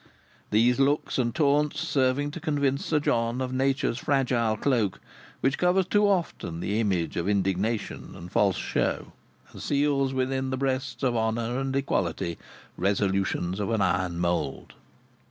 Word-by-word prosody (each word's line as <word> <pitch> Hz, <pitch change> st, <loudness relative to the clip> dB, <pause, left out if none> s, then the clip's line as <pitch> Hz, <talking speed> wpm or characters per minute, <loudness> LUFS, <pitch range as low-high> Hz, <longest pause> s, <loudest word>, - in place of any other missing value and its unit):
These 120 Hz, +4 st, +3 dB
looks 140 Hz, 0 st, +1 dB
and 120 Hz, -1 st, 0 dB
taunts 145 Hz, 0 st, +2 dB
serving 145 Hz, -2 st, +1 dB
to 170 Hz, -, -6 dB
convince 140 Hz, -4 st, 0 dB
Sir 155 Hz, -, +2 dB
John 115 Hz, -3 st, 0 dB
of 130 Hz, -1 st, -2 dB
Nature's 130 Hz, -2 st, 0 dB
fragile 120 Hz, -6 st, +1 dB
cloak 115 Hz, -7 st, +1 dB, 0.4 s
which 135 Hz, +1 st, +1 dB
covers 180 Hz, +1 st, +3 dB
too 205 Hz, +3 st, +3 dB
often 170 Hz, -, -1 dB
the 100 Hz, +5 st, -1 dB
image 95 Hz, -7 st, 0 dB
of 85 Hz, +3 st, 0 dB
indignation 100 Hz, +2 st, -1 dB
and 85 Hz, +1 st, -10 dB
false 100 Hz, -2 st, +2 dB
show, -, -, -1 dB, 0.4 s
and -, -, -9 dB
seals 140 Hz, -2 st, +1 dB
within 130 Hz, 0 st, -1 dB
the 130 Hz, -, -2 dB
breasts 135 Hz, 0 st, -2 dB
of 125 Hz, -2 st, +2 dB
honour 115 Hz, +2 st, 0 dB
and 135 Hz, 0 st, -2 dB
equality 85 Hz, -10 st, -1 dB, 0.4 s
resolutions 95 Hz, -2 st, 0 dB
of 105 Hz, -, -1 dB
an 110 Hz, -3 st, +1 dB
iron 90 Hz, -1 st, 0 dB
mould. 85 Hz, 0 st, -2 dB
125 Hz, 150 wpm, -27 LUFS, 100-140 Hz, 0.4 s, These